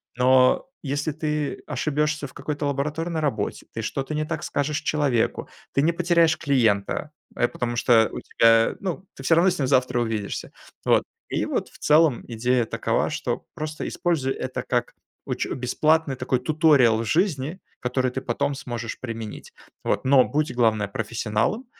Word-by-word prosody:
Но 130 - +4 0.2
если 145 +2 -1
ты 150 -1 -2
ошибешься 150 +2 -1
в 130 - -17
какой-то 150 -1 -4
лабораторной 150 +4 -2
работе, 145 -3 -2
ты - - -3
что-то 135 +3 -3
не 155 0 -1
так 160 0 -4
скажешь 145 +1 -1
человеку- 140 -7 0 0.3
ты 140 - +3
не 165 +3 +2
потеряешь 170 -2 +3
клиента, 125 0 +1 0.2
э, 120 - +2
потому 120 0 -3
что 115 -2 +4
у - - -5
тебя 115 0 +4
ну, 190 0 -4
ты 135 - -10
всё 165 - +4
равно 175 +3 +5
с 180 - -4
ним 135 - +1
завтра 125 -2 +2
увидишься. 110 -3 -3 0.3
Вот. - - +4 0.3
И - - -1
вот - - -2
в - - -17
целом 150 -4 +4
идея 120 +1 +1
такова, - - 0
что - - -3
просто 155 0 -5
используй 150 -7 0
это 130 0 -4
как - - -1 0.3
уч - - -2
бесплатный, 150 +4 +1
такой, 125 0 -1
туториал 135 -5 +4
в 115 - -2
жизни, 160 - 0 0.2
который 125 0 0
ты 130 - -4
потом 130 +3 -1
сможешь 120 -4 -5
применить. 115 -3 -7 0.3
Вот. - - -1
Но 130 -1 +6
будь, 150 +1 -1
главное, 110 -4 +2
профессионалом, 110 - -1
135 Hz, 160 wpm, -24 LUFS, 120-155 Hz, 0.3 s, Но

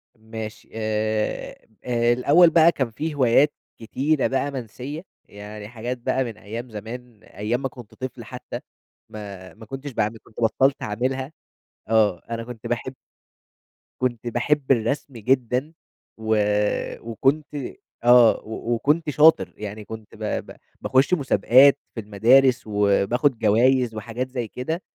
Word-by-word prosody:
ماشي، 110 -1 -8
آآ، 110 -1 -1 0.4
آآ، 120 -1 +2
الأول 150 +8 +5
بقى 165 0 +6
كان 130 -7 -2
في 155 +7 -4
هوايات 135 +2 +4 0.2
كتيرة 135 +6 0
بقى 135 +2 -1
منسيّة، 130 +4 -6 0.2
يعني 105 +1 -10
حاجات 120 +2 -5
بقى 125 +2 0
من 115 -4 -7
أيام 115 +3 -7
زمان، 115 +1 -9
أيام 110 +5 -3
ما 135 - -2
كنت 120 -4 -13
طفل 130 -1 -6
حتى - - -7 0.5
ما 100 -3 -9
ما 110 - -13
كنتش 135 +4 -7
باعمل 110 -2 -1
كنت 110 - -12
بطّلت 135 +4 +2
اعملها. 130 +6 -2 0.6
آه، 110 -5 +3
أنا 115 0 -3
كنت 115 -2 -9
باحب 120 +2 -3 1.1
كنت 120 -2 -2
باحب 135 +4 0
الرسم 135 +4 0
جدًا 125 +5 0 0.4
و 110 0 0 0.7
وكنت 135 +6 0 0.6
آه 120 -1 +7
و 110 +2 -3
وكنت 150 +7 +1
شاطر، 150 +2 +4
يعني 105 0 -7
كنت 110 -1 -10
ب 110 - -9 0.3
ب - - -12 0.3
باخُش 130 +6 +2
مسابقات 135 - +5 0.2
في - - -4
المدارس 125 +5 +4
وباخد 105 +5 +2
جوايز 120 +2 +3
وحاجات 115 +4 -4
زي 125 -3 -4
كده. 160 - -4
120 Hz, 135 wpm, -23 LUFS, 110-135 Hz, 1.1 s, آه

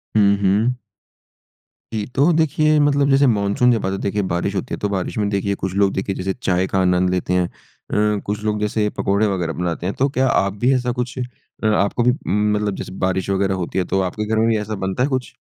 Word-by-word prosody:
हुँ, 100 -1 +5
हुँ। 105 +6 +2 1.1
जी, 105 -2 -2
तो 145 +6 +4
देखिए 155 -1 +2
मतलब 145 -1 +3
जैसे 135 0 +4
मानसून 105 +2 +2
जब 115 -5 0
आता, 95 0 -1
देखिए 100 +1 -1
बारिश 90 +3 -1
होती 95 - -3
है, - - -2
तो 105 - -1
बारिश 95 0 -3
में 105 -1 +1
देखिए 100 0 -1
कुछ 95 -1 -2
लोग 100 -1 +2
देखिए 95 0 -2
जैसे 95 +1 -2
चाय 95 -5 0
का 95 - 0
आनंद 90 0 +2
लेते 90 0 -1
हैं 90 -1 +2
अ, 105 +3 -3
कुछ 105 +1 -3
लोग 105 -1 0
जैसे 105 0 0
पकौड़े 100 +2 +1
वगैरह 90 -5 -1
बनाते 85 -1 -3
हैं। 95 - -2
तो 135 +2 +3
क्या 130 -1 +1
आप 100 -5 +1
भी 130 +2 +4
ऐसा 125 -1 0
कुछ 125 +1 -5 0.5
अ, - - +3
आपको 105 +2 +1
भी 125 - +4 0.2
मतलब 105 0 +1
जैसे - - -7
बारिश 95 0 -1
वगैरह 95 0 +1
होती 85 - -5
है 95 - +1
तो 95 - 0
आपके 95 +3 -2
घर 110 +1 -1
में 110 +1 +3
भी 115 -1 +2
ऐसा 105 +1 -4
बनता 95 +6 -1
है 140 - +1
कुछ? 130 -2 -3
105 Hz, 230 wpm, -20 LUFS, 95-120 Hz, 1.1 s, हुँ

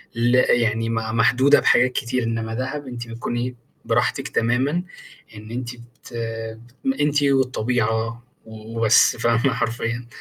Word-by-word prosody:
ل 120 +1 +2
يعني 115 -2 +2
م - - -1
محدودة 120 +5 +3
بحاجات 125 +1 +4
كتير 125 0 -2
إنّما 115 -1 -2
دهب 130 +4 -4
أنتِ 120 -1 -7
بتكوني 120 +2 -4 0.3
براحتِك - - 0
تمامًا 130 +9 0 0.5
إن 110 +1 -10
أنتِ 120 0 -4 0.3
ت - - -13 0.9
أنتِ 145 0 +2
والطبيعة 120 -4 0 0.2
و 110 +1 -10
وبس 110 -1 +5
فاهمة 120 +3 +2
حرفيًا 120 0 -2
120 Hz, 125 wpm, -22 LUFS, 115-130 Hz, 0.9 s, وبس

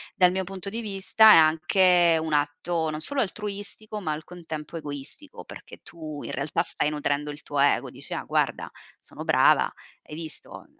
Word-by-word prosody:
dal 180 -4 +5
mio 190 0 -1
punto 195 +1 -6
di 225 +3 -4
vista, 215 +1 +5
è - - +9
anche 165 +2 +4
un 160 -1 -4
atto 160 +3 -1
non 155 0 -4
solo 275 - 0
altruistico, 210 +1 -5
ma 155 -5 -2
al 150 +1 -7
contempo 165 -2 -8
egoistico 150 - -8
perché - - -12
tu, 155 -3 -8
in - - -6
realtà, 160 +2 -1
stai 150 - -1
nutrendo 150 0 -2
il 145 - -11
tuo 145 -1 -3
ego. 145 - +3
Dici: - - -10
"Ah - - -3
guarda, - - -1 0.3
sono - - -9
brava, - - +4 0.3
hai 150 - -10
visto?" 160 -1 -9
165 Hz, 180 wpm, -25 LUFS, 150-195 Hz, 0.3 s, è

